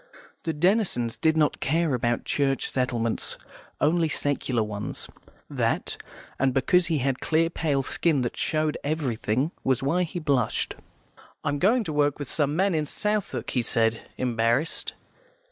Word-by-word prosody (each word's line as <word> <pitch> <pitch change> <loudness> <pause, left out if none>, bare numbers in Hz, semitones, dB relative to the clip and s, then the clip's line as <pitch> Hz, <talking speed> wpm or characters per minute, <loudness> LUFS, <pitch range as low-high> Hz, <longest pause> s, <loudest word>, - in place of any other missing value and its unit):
The 165 - +1
Denisons 170 - +1
did 160 0 +2
not 150 -2 +2
care 160 +1 +1
about 120 -1 0
Church 135 -2 +1
settlements, 120 -3 0 0.4
only 160 +2 +2
secular 135 -5 0
ones; 105 -1 -5 0.4
that, - - -1 0.4
and 135 -1 +2
because 175 +6 +3
he 165 -2 +1
had 135 -1 0
a - - -22
clear, 165 +3 +1
pale 145 -5 0
skin 155 0 +1
that 120 - -3
showed 155 -1 0
everything, 140 -2 -1
was 130 -1 +1
why 165 +7 +2
he 175 0 -3
blushed. 140 -8 0 0.7
"I'm 145 0 -1
going 225 - +3
to 160 - -4
work 145 -1 +2
with 145 -3 -6
some 145 -1 +1
men 190 +2 +2
in 155 -2 0
Southwark," 210 +4 -2
he 125 - +1
said, 115 -1 +2 0.2
embarrassed. 120 +4 0
145 Hz, 150 wpm, -26 LUFS, 125-165 Hz, 0.7 s, because